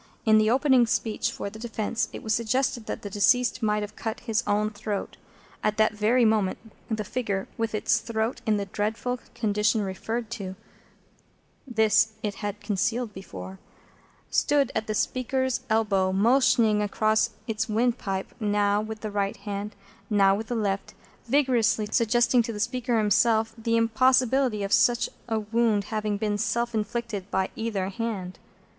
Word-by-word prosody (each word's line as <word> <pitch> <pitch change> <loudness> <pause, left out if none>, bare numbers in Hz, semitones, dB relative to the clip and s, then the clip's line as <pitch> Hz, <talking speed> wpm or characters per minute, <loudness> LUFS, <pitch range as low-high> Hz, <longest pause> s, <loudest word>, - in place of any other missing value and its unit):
In 220 -1 +6
the 215 0 +3
opening 260 -1 +4
speech 225 -1 -1
for 200 - -5
the 220 - -10
defence, 225 -1 -2
it - - -8
was 220 - 0
suggested 235 +1 0
that - - -5
the 205 - -5
deceased 230 +4 +2
might 210 -1 +1
have 210 +1 -8
cut 225 -1 -4
his 225 -1 0
own 210 +1 +1
throat. 210 -1 -4 0.5
At 215 -1 0
that 215 0 +3
very 225 +4 +3
moment, 215 -4 +2 0.3
the 220 -2 -1
figure, 205 -3 -3
with 225 -1 -2
its 215 - +2
throat 225 +1 -2
in 215 -1 +3
the 200 - -2
dreadful 220 +5 -2 0.2
condition 210 -1 +1
referred 220 +4 -4
to 195 -5 -5 1.1
(this 220 -2 +3
it 210 -1 -1
had 205 0 -3
concealed 220 +3 -1
before), 95 - -9 0.7
stood 290 -1 +2
at 220 +1 -2
the 215 - -2
speaker's 260 +2 0
elbow, 200 -4 +2
motioning 220 0 +3
across 215 +1 +2
and - - -23
across - - -31
its 220 0 -2
windpipe, 215 -4 -1
now 205 -1 +2
with 215 0 -6
the 215 - -4
right 200 -1 -1
hand, 205 0 -5 0.3
now 200 -2 +4
with 220 +3 -3
the 240 - -2
left, 200 -3 -2 0.3
vigorously 245 -5 +2
suggesting 240 +1 +3
to 230 - -3
the 210 - -6
speaker 245 +1 0
himself 220 +1 +3
the 230 0 0
impossibility 255 0 +3
of 195 - -1
such 240 0 +3 0.2
a 225 -1 +1
wound 220 -1 +1
having 210 -1 -1
been 205 -1 -1
self 235 +2 -1
inflicted 215 -2 -3
by 190 0 0
either 210 -4 -2
hand. 200 -3 -4
220 Hz, 165 wpm, -26 LUFS, 205-235 Hz, 1.1 s, In